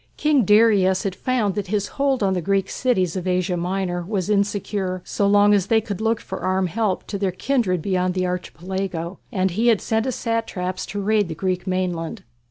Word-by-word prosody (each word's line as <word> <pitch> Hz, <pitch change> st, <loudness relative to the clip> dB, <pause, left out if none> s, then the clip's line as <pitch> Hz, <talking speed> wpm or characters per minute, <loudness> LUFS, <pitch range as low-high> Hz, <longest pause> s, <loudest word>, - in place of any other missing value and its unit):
King 295 Hz, -6 st, +3 dB
Darius 205 Hz, -3 st, +4 dB
had 195 Hz, -, -1 dB
found 225 Hz, -2 st, 0 dB
that 200 Hz, -1 st, -3 dB
his 205 Hz, +1 st, -1 dB
hold 275 Hz, -4 st, 0 dB
on 190 Hz, -1 st, +2 dB
the 180 Hz, -, -1 dB
Greek 195 Hz, +2 st, 0 dB
cities 190 Hz, -9 st, 0 dB
of 185 Hz, -1 st, -3 dB
Asia 180 Hz, 0 st, +1 dB
Minor 180 Hz, 0 st, -2 dB
was 190 Hz, +1 st, -2 dB
insecure 200 Hz, -2 st, -1 dB
so 200 Hz, -, 0 dB
long 205 Hz, +1 st, +5 dB
as 195 Hz, -2 st, +2 dB
they 225 Hz, 0 st, +4 dB
could 210 Hz, -2 st, -5 dB
look 225 Hz, 0 st, +1 dB
for -, -, -7 dB
armed 185 Hz, 0 st, 0 dB
help 210 Hz, 0 st, -1 dB
to 200 Hz, -, -5 dB
their 195 Hz, -2 st, 0 dB
kindred 185 Hz, -, 0 dB
beyond 185 Hz, -2 st, 0 dB
the 185 Hz, 0 st, 0 dB
Archipelago, 180 Hz, 0 st, -4 dB
and 190 Hz, -4 st, 0 dB
he 220 Hz, +7 st, 0 dB
had 225 Hz, -4 st, +5 dB
sent 220 Hz, 0 st, 0 dB
his 255 Hz, -, -1 dB
satraps 210 Hz, -6 st, -2 dB
to 205 Hz, -, -4 dB
raid 205 Hz, 0 st, +2 dB
the 160 Hz, -, -5 dB
Greek 185 Hz, +2 st, -2 dB
mainland. 185 Hz, +1 st, -2 dB
195 Hz, 200 wpm, -22 LUFS, 185-215 Hz, -, long